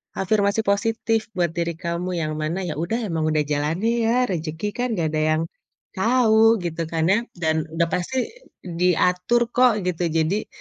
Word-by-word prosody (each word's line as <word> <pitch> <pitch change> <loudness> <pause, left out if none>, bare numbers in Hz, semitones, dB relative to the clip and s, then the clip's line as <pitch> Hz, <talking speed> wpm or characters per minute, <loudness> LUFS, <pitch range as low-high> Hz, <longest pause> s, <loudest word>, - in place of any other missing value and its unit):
afirmasi 200 +2 +1
positif 225 +2 0
buat 175 -2 +1
diri 170 -1 -2
kamu, 170 +1 -3
yang 155 -2 -2
mana 165 +5 -2
ya 160 - -3
udah 195 +8 -1
emang 160 -5 -1
udah 155 -1 +1
jalannya 160 +10 0 0.2
ya, - - +3 0.2
rezeki 160 +3 -3
kan 250 - +1
nggak 160 -2 +1
ada 155 - +1 0.2
yang - - -1 0.5
tahu, 225 +1 +4
gitu 165 -1 -3
kan 160 -1 -1
ya? 205 - +4 0.2
Dan 160 -2 -1
udah 165 +1 0
pasti 245 +9 -1 0.4
diatur 180 +5 +1
kok, 245 -6 +3
gitu. 175 -1 -1
Jadi, 165 +6 0
180 Hz, 165 wpm, -23 LUFS, 160-215 Hz, 0.5 s, tahu